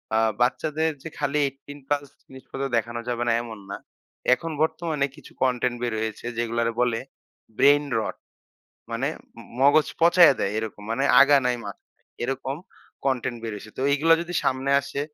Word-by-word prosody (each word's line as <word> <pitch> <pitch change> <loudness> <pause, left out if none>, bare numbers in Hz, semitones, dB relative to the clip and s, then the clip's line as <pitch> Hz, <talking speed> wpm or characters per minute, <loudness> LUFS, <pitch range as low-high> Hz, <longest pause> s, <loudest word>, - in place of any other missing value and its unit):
আ - - +4 0.2
বাচ্চাদের 155 +5 +1
যে 165 - -6
খালি 145 0 0
১৮ 140 +1 -10
প্লাস 145 0 0 0.2
জিনিসপত্র 135 +1 -7
দেখানো 120 +1 -2
যাবে 120 0 -1
না - - +4
এমন 110 -3 -8
না। - - -4 0.6
এখন 165 +5 -3
বর্তমানে 160 -2 0
কিছু 150 - -15
কনটেন্ট 125 -1 +1
বের 120 -2 -1
হয়েছে 110 0 -4
যেগুলারে 115 0 0
বলে 120 -2 +1 0.6
Brain 145 +1 +5
Rot। 110 - -4 0.7
মানে 120 +4 -1 0.3
ম - - -9 0.2
মগজ 145 +3 +5
পচাইয়া 170 -2 +7
দেয় 100 - 0
এরকম। 110 -1 -5
মানে 135 +4 0 0.2
আগা 140 +1 +7
নাই 125 -1 +1
মাথা 100 -1 -9
নাই - - -43 0.2
এরকম 135 +1 -3 0.5
কনটেন্ট 130 -2 -1
বের 115 -1 -4
হইছে। 110 +1 -11
তো - - -1
এইগুলা 160 +3 +5
যদি 175 +1 -7
সামনে 130 +1 0
আসে, 140 0 -5
130 Hz, 165 wpm, -25 LUFS, 120-145 Hz, 0.7 s, পচাইয়া